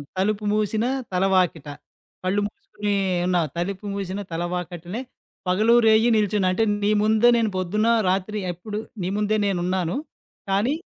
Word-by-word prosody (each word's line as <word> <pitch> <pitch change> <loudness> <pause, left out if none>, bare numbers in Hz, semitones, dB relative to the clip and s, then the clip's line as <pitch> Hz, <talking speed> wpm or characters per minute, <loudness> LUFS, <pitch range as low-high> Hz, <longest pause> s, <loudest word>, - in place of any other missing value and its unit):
'తలుపు 210 +2 0
మూసిన 215 +2 0 0.3
తలవాకిట.' 180 -5 +1 0.5
కళ్ళు 195 +3 +1
మూసుకొని 210 - -6 0.3
ఎన్నా 180 -1 +2 0.2
తలుపు 195 +4 -3
మూసిన 195 0 -4
తలవాకటనే 175 +4 -4 0.5
పగలూ, 215 +6 +4
రేయి 220 +2 +5
నిలుచున్నా 205 -2 +2
అంటే 225 - +1 0.2
నీ 205 - +3
ముందే 220 +2 +4
నేను 225 -2 +1
పొద్దున్న, 210 +5 0 0.2
రాత్రి 195 +3 -1
ఎప్పుడు 210 +5 -6 0.2
నీ 180 - -1
ముందే 210 +1 +1
నేను 190 -3 0
ఉన్నాను. 180 -1 -1 0.5
కానీ, 205 +9 +2
200 Hz, 130 wpm, -23 LUFS, 180-215 Hz, 0.5 s, రేయి